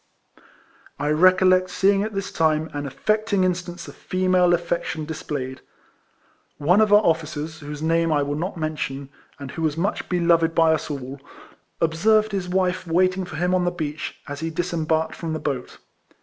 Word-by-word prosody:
I 145 +1 -1
recollect 185 +3 +4
seeing 195 +2 +2
at 215 0 -3
this 195 0 -3
time 160 0 +1
an 145 -1 -4
affecting 215 +6 0
instance 180 -1 -2
of - - -9
female 185 -1 +1
affection 170 -2 -1
displayed. 140 -4 -5 1.0
One 175 +8 +3
of 215 -1 +3
our 210 +1 +6
officers, 155 -1 -1
whose 150 0 -7
name 165 0 +2
I 145 -2 +2
will 145 +1 -2
not 175 +5 -3
men 155 -1 -3
tion, 135 -1 -4 0.3
and 140 -3 -8
who - - -6
was 155 -1 0
much 195 +5 -2
beloved 170 -2 +2
by 165 -1 +5
us 155 - -2
all^ 135 -2 -6 0.6
observed 215 +7 +2
his 190 -3 -3
wife 185 0 0
waiting 185 +2 +2
for 175 -3 -9
him 180 +3 0
on 185 -1 +2
the 175 - +2
beach, 155 -3 -5
as 145 0 -6
he 165 - -3
disembarked 160 -1 -1
from 165 -2 -4
the 155 - -3
boat. 135 -5 -4
165 Hz, 175 wpm, -23 LUFS, 155-185 Hz, 1.0 s, our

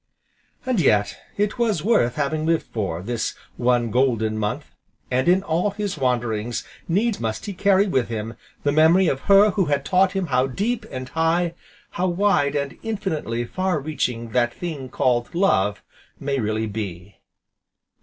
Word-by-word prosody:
And 255 -5 +1
yet 105 -8 +2 0.2
it 205 +3 0
was 215 -9 +1
worth 125 - +2
having 155 +1 -1
lived 165 0 +1
for, 95 -6 -3
this 115 +1 -2 0.2
one 120 -2 +1
golden 115 -4 +1
month, 105 -1 -2 0.5
and 130 +4 +1
in 185 +2 +4
all 170 +4 +1
his 205 -1 -3
wanderings 120 -4 -1 0.2
needs 205 +5 +1
must 110 -1 -3
he 205 - -4
carry 200 +1 +3
with 130 - 0
him 115 0 -4 0.3
the 145 - +2
memory 160 +5 +5
of 135 - 0
her 200 +1 +7
who 190 -1 +1
had 145 -2 0
taught 185 0 +3
him 195 -2 -1
how 130 +1 +3
deep 215 - -2
and 130 -1 -6
high, 165 +1 +1 0.4
how 185 +1 -1
wide 175 -6 +2
and 140 -1 -3
infinitely 160 - -2
far 185 +4 -1
reaching 125 -6 -2
that 120 0 +1
thing 150 -7 -5
called 120 +3 0
"Love" 105 - +2 0.4
may 140 -1 -1
really 110 0 -1
be. 100 -3 -6
140 Hz, 160 wpm, -23 LUFS, 120-185 Hz, 0.5 s, her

